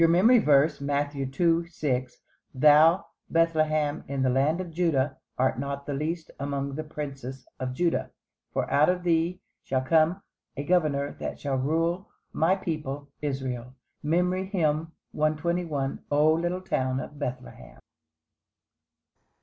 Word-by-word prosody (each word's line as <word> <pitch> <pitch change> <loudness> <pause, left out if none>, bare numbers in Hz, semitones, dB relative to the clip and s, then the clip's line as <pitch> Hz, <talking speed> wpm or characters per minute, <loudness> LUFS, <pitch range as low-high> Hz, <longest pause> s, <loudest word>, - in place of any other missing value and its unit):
MEMORY 200 +9 +6
VERSE, 150 -4 +3
Matthew 140 -1 -1
2: 165 +4 +1
6 130 -7 -2 0.4
"Thou, 155 +6 +6 0.2
Bethlehem, 155 -3 +1
in 135 -1 -1
the 130 - +3
land 140 +6 +2
of 180 -2 -5
Juda, 155 -5 +1 0.2
art 130 -2 +1
not 140 +1 -4
the 145 - -3
least 160 +4 -3
among 140 0 -2
the 155 +3 -4
princes 135 -4 -7
of 130 0 -3
Juda: 170 +3 0 0.4
For - - -1
out 150 +3 +5
of 180 -1 0
thee 170 +1 +1 0.2
shall 130 -1 -1
come 160 +7 +2 0.3
a 140 - -2
Governor 145 -4 +1
that - - -5
shall 140 -2 -1
rule 165 +7 0 0.3
my 170 +4 +3
people 150 -6 -4
Israel." 130 -3 -4 0.3
MEMORY 180 +4 +1
HYMN 165 -4 0 0.2
_"O 155 -1 +1
little 175 +3 -1
town 130 -7 -1
of 145 +2 -8
Bethlehem." 125 - -6
150 Hz, 130 wpm, -27 LUFS, 135-165 Hz, 0.4 s, MEMORY